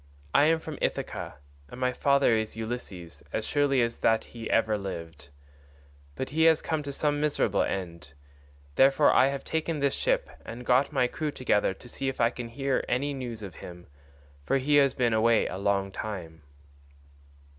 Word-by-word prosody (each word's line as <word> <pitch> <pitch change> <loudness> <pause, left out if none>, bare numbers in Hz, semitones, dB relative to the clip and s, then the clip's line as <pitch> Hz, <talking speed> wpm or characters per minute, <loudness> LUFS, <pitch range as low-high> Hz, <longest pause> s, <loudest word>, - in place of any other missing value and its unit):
I 145 - +5
am 165 +1 +4
from 160 -2 -8
Ithaca, - - -3 0.3
and 125 - -10
my 125 0 +1
father 140 -3 +3
is 110 -1 -2
Ulysses, 110 -7 -6
as - - -2
surely 140 -3 +2
as 115 0 -2
that 110 0 +2
he 115 -2 -8
ever 110 -1 +2
lived. 85 -7 -7 0.9
But 130 - -4
he 160 +2 +3
has 160 -1 +6
come 160 -2 -2
to 140 -1 -5
some 145 +1 0
miserable 140 -9 +1
end. 85 -6 -4 0.6
Therefore 135 +2 +5
I 130 - +5
have 140 0 -3
taken 160 0 -2
this 140 -1 +1
ship - - 0 0.2
and 120 +2 -8
got 125 +3 +3
my 125 - +2
crew 150 +5 -3
together 105 -8 0
to 120 - -14
see 135 +2 -3
if 135 - -6
I 115 0 +3
can 120 -1 -6
hear 135 +3 -1
any 140 +4 0
news 120 -5 -6
of 95 -4 -7
him, 90 0 -10 0.6
for 105 - +1
he 145 +2 +2
has 140 -2 +4
been 120 -3 +1
away 115 +1 +3
a 90 - -4
long 100 -1 0
time." 90 -7 -6
125 Hz, 180 wpm, -28 LUFS, 105-140 Hz, 0.9 s, has